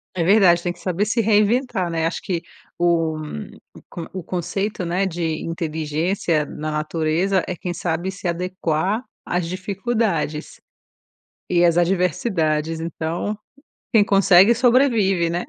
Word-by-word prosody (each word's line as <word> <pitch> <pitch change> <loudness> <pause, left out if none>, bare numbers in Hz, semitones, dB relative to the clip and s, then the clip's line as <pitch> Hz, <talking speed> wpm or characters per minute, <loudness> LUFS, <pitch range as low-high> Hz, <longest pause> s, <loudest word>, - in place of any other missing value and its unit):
É 175 - 0
verdade. 180 -2 +5
Tem 175 0 -2
que - - -21
saber 185 +2 -1
se 230 +2 +1
reinventar, 210 -2 +2
né. 165 -1 -1
Acho 165 - -2
que 175 -3 -2 0.4
o 165 -2 +1
um 150 - -6 0.3
o - - -13
con 170 -2 -7
o 185 -2 -5
conceito, 185 +3 -3
né, 180 +3 0
de 165 -3 -2
inteligência 160 0 -1
na 155 +1 -5
natureza 160 +5 0
é 180 - -3
quem 175 +1 -4
sabe 175 +2 -2
se 195 -1 -6
adequar 180 +3 -1 0.2
às 175 -1 -1
dificuldades, 185 -4 -2 0.9
e 175 -1 +3
às 170 0 +4
adversidades. 165 -3 0
Então, 165 +5 -3 0.6
quem 220 -4 +6
consegue 195 +1 +6
sobrevive, 230 -8 +3
né. 175 +1 -2
175 Hz, 140 wpm, -21 LUFS, 165-195 Hz, 0.9 s, quem